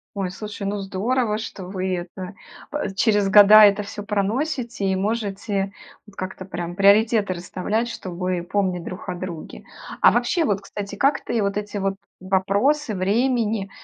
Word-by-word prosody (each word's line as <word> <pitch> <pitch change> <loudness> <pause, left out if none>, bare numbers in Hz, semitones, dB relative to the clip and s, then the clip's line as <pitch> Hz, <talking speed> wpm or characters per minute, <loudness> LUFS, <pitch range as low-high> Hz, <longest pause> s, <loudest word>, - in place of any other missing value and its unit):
Ой, 195 -2 -2
слушай, 210 +1 -6
ну 205 +1 -2
здорово, 210 +4 -1
что 205 -3 -7
вы 185 0 -2
это 180 +2 -6 0.6
через 205 -2 +3
года 210 +1 +9
это 205 0 +4
всё 205 0 -7
проносите 225 +3 -2
и 190 - +1
можете 200 -1 -2 0.3
вот 205 -2 -18
как-то 185 0 -6
прям 175 -2 -5
приоритеты 205 +1 +4
расставлять, 185 +6 -2
чтобы 180 -4 -3
помнить 185 -1 -1
друг 185 +2 -8
о 180 - -2
друге. 175 -3 -7 0.4
А - - +7
вообще 245 +8 +1
вот, 200 -7 0
кстати, 200 0 -7
как 275 +6 +1
ты 235 - -1
вот 200 0 -1
эти 210 0 -4
вот 195 -1 -1 0.2
вопросы 200 +8 +1
времени, 215 +1 0
200 Hz, 150 wpm, -23 LUFS, 190-215 Hz, 0.6 s, года